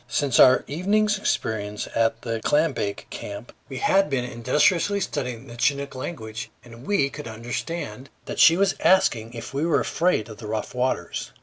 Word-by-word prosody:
Since 140 -4 +1
our 130 0 +7
evening's 205 +6 +1
experience 105 - -2
at 115 0 +1
the 115 -2 -3
clambake 145 -9 0
camp, 100 +4 -7 0.2
we 135 - -6
had 195 +5 +3
been 130 -3 -1
industriously 150 - +2
studying 125 - -4
the 120 -2 -11
Chinook 140 +2 0
language, 115 -5 -6 0.2
and 120 +2 -13
we 170 -10 +2
could 150 -4 -8
understand 120 +3 -5 0.2
that - - -6
she 165 +1 +7
was 195 0 +3
asking 120 -11 +2
if 115 +2 -7
we 140 +3 -1
were 165 -1 +3
afraid 165 - +1
of 110 -2 -10
the 110 - -7
rough 110 0 -3
waters. 125 -9 -2
130 Hz, 170 wpm, -24 LUFS, 115-165 Hz, 0.2 s, our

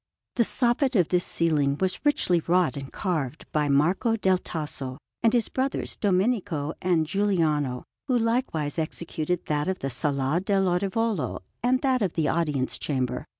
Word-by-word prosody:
The - - +4
soffit 250 +3 +1
of 175 - +2
this 180 -1 +2
ceiling 145 -4 +1
was 190 -1 -1
richly 290 - +3
wrought 180 -1 +3
and 135 -1 -7
carved 155 -7 -3
by 150 -1 +1
Marco 175 - +2
del 190 -4 +2
Tasso 145 -6 -4 0.2
and 225 - +4
his 240 -2 +2
brothers, 265 +1 -2
Domenico 185 -6 0
and 175 -3 +2
Giuliano, 155 -9 0 0.2
who 255 -3 +2
likewise 230 - 0
executed 160 +1 -3
that 150 +1 -1
of 190 0 0
the 135 -4 -3
Sala 140 +4 0
dell' 195 -1 +2
Orivolo 195 +2 -1 0.2
and 255 +2 +2
that 260 -2 +2
of 190 -5 0
the 160 -3 0
Audience 150 -6 0
Chamber. 130 -4 -2
175 Hz, 155 wpm, -26 LUFS, 150-210 Hz, 0.2 s, The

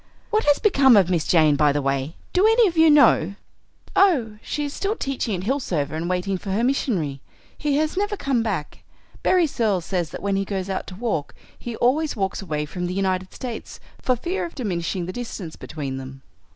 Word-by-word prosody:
What 435 0 +2
has 290 -1 +5
become 275 - +5
of 185 -2 +4
Miss 170 -4 0
Jane, 155 -4 +4
by 150 0 +4
the 145 - 0
way? 135 +2 -1 0.2
Do 375 +4 +4
any 450 0 +5
of 345 - -3
you 320 0 +6
know?" 230 - +5 0.6
"Oh, 250 - +3
she 295 - -3
is 285 - -5
still 405 +2 -1
teaching 265 - -2
at 180 - -5
Hillsover 190 - -1
and 165 +2 -3
waiting 185 +1 -1
for 200 - -7
her 205 +5 0
missionary. 185 - 0 0.3
He 290 -1 -1
has 310 +1 0
never 410 +2 -1
come 270 -7 0
back. 195 -10 -3 0.4
Berry 365 -2 +4
Searles 215 - 0
says 175 -4 -1
that - - -8
when 200 -1 +1
he 195 - +1
goes 195 -1 -3
out 190 - -3
to 185 - -8
walk 205 -8 -3 0.2
he 235 -1 -7
always 290 +7 +1
walks 195 -2 -2
away 150 -5 -3
from 180 +4 -4
the 180 - -4
United 185 -1 -1
States, 240 -3 -7 0.2
for 255 - +2
fear 345 +10 -3
of 340 - -6
diminishing 180 - -2
the 185 - -5
distance 215 -9 -6
between 140 -4 -5
them." 135 0 -9
200 Hz, 205 wpm, -23 LUFS, 170-275 Hz, 0.6 s, you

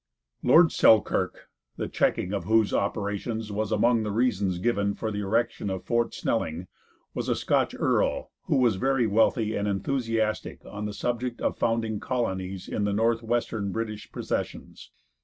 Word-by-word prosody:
Lord 160 +6 +6
Selkirk, 110 -2 +3 0.3
the - - -2
checking 90 - 0
of 100 -4 -2
whose 110 +1 +3
operations 105 +2 -2
was 105 +1 -2
among 115 +2 +3
the 105 - -2
reasons 100 -5 +1
given 100 0 0
for 110 - -3
the 105 - -3
erection 110 +1 0
of 95 -1 -4
Fort 120 0 0
Snelling, 85 -6 -2 0.5
was - - -3
a - - +2
Scotch - - +1
earl - - +1
who - - +1
was 120 -6 +3
very 135 +1 +2
wealthy 110 +1 +2
and 100 - -1
enthusiastic 115 0 -1
on 105 +1 -6
the 105 - -4
subject 120 +2 -2
of - - 0
founding 115 -2 0
colonies 95 -7 -3
in 105 - -2
the 100 0 0
Northwestern 115 -1 0
British 110 0 -5
possessions. - - -5
110 Hz, 155 wpm, -27 LUFS, 100-115 Hz, 0.5 s, Lord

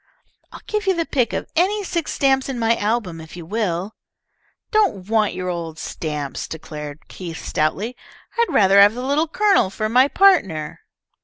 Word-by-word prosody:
"I'll - - -11
give 425 -1 -2
you 380 - +3
the 335 -1 -1
pick 250 -6 0
of - - -3
any 405 +5 +2
six 340 -4 -2
stamps 270 -1 +1
in 265 - -3
my 230 0 +2
album 205 -7 -2
if 160 +2 -11
you 170 - -8
will." 195 0 -2 0.8
"Don't 395 - +1
want 215 -2 +1
your 185 0 -4
old 165 -2 -4
stamps," 150 -3 -4
declared 150 -2 -8
Keith, 170 -3 -8
stoutly. 185 +9 -1 0.4
"I'd 470 - +4
rather 200 0 +6
have 205 +2 +6
the 250 +1 -4
Little 295 +4 +1
Colonel 395 - +3
for 215 +3 -3
my 255 +4 +5
partner." 200 - +2
215 Hz, 170 wpm, -21 LUFS, 170-285 Hz, 0.8 s, rather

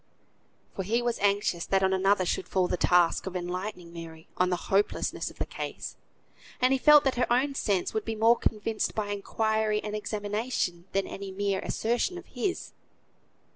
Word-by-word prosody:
For - - -2
he 230 +6 0
was 240 -1 -1
anxious 200 -4 +1
that 195 0 +2
on 190 0 +3
another 190 0 +3
should 175 - -1
fall 185 -1 +1
the - - 0
task 175 +1 +3
of 190 - -5
enlightening 180 0 -4
Mary 165 -1 -9
on 180 0 +2
the 180 - +1
hopelessness 195 +3 0
of - - -16
the - - -2
case, - - -6 0.6
and 255 +1 +4
he 265 - +1
felt 300 +1 +7
that 265 -2 0
her 245 - +1
own 265 +4 +2
sense 200 -8 0
would 220 - -1
be 225 0 -3
more 225 +2 +5
convinced 220 -1 -1
by 210 -2 -2
inquiry 215 +1 0
and 210 0 -4
examination 210 -4 -2
than 195 0 +1
any 200 0 -7
mere 200 0 -1
assertion 240 +11 -1
of 360 - -9
his. 385 -3 -3
205 Hz, 180 wpm, -28 LUFS, 185-225 Hz, 0.6 s, felt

